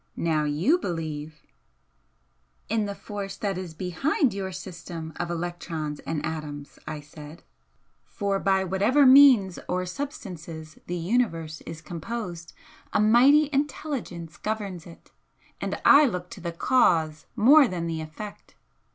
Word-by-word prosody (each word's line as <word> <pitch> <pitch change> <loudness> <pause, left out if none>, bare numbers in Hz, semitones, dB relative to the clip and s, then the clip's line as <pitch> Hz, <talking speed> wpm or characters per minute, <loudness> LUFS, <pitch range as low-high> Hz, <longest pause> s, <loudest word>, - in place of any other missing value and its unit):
Now 155 -2 +1
you 165 - +2
believe 155 - -5 0.6
" - - -43
"In 220 -1 +1
the 200 - -5
Force 200 0 -6
that 200 -2 -2
is 180 -3 -6
BEHIND 205 - 0
your 195 -1 -4
system 170 -3 -7
of 175 - -3
electrons 165 -3 -4
and 155 -2 -3
atoms" 150 -3 -6
I 155 -1 -5
said 150 +2 -12 0.6
"For 200 -2 -2
by 190 -1 +2
whatever 205 +10 +3
means 255 -9 +7
or 180 0 0
substances 175 - -7
the 175 - -2
Universe 165 -5 -1
is 160 0 -8
composed, 175 -1 -6 0.4
a - - +1
mighty 255 +8 +6
Intelligence 260 - -3
governs 200 -6 -4
it 170 - -15 0.5
and - - -3
I 290 +1 +8
look 180 -5 -4
to 190 - -9
the 170 0 -3
Cause 165 -6 +2
more 275 +5 +7
than 175 -5 -3
the 165 -1 -3
Effect. 160 +7 -9
180 Hz, 135 wpm, -26 LUFS, 160-215 Hz, 0.6 s, I